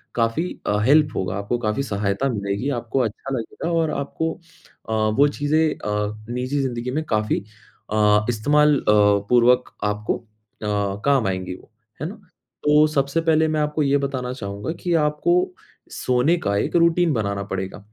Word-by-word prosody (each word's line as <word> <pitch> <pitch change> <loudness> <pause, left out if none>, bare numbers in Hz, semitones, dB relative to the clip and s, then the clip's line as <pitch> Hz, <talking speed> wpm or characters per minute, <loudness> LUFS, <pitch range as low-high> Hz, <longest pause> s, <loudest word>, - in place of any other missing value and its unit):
काफ़ी 115 +7 +1 0.2
अ, 105 0 +2
हेल्प 150 +1 +4
होगा, 95 0 -2
आपको 100 +4 -2
काफ़ी 110 +4 -1
सहायता 100 +3 -1
मिलेगी, 100 +3 -2
आपको 120 0 -2
अच्छा 120 +4 -4
लगेगा 140 +9 -4
और 165 -2 +1
आपको 160 +3 -2 0.6
अ, 110 - -1
वो 110 +6 +3
चीज़ें 155 +2 +2
अ, 105 0 -3
निजी 130 +4 -2
ज़िंदगी 125 -1 -3
में 155 +3 -1
काफ़ी 110 -1 +1 0.5
अ, 105 0 +3
इस्तेमाल 150 +6 +3
अ, - - -11 0.5
पूर्वक 125 +1 +4
आपको 105 0 -1
अ, 115 - -20 0.8
काम 135 -6 +3
आएँगी 95 -1 -3
वो, - - -18 0.3
है - - -1
ना? - - -9 0.5
तो 150 +1 +6
सबसे 140 +1 0
पहले 160 -1 +3
मैं 155 0 0
आपको 150 0 0
ये 140 0 +3
बताना 130 -3 -3
चाहूँगा 100 +2 -5
कि 175 -1 0
आपको 150 - +1 0.6
सोने 130 +7 +2
का 100 0 +1
1 - - -1
रूटीन 170 -1 +3
बनाना 100 -4 -1
पड़ेगा। 95 0 -5
125 Hz, 160 wpm, -22 LUFS, 105-150 Hz, 0.8 s, तो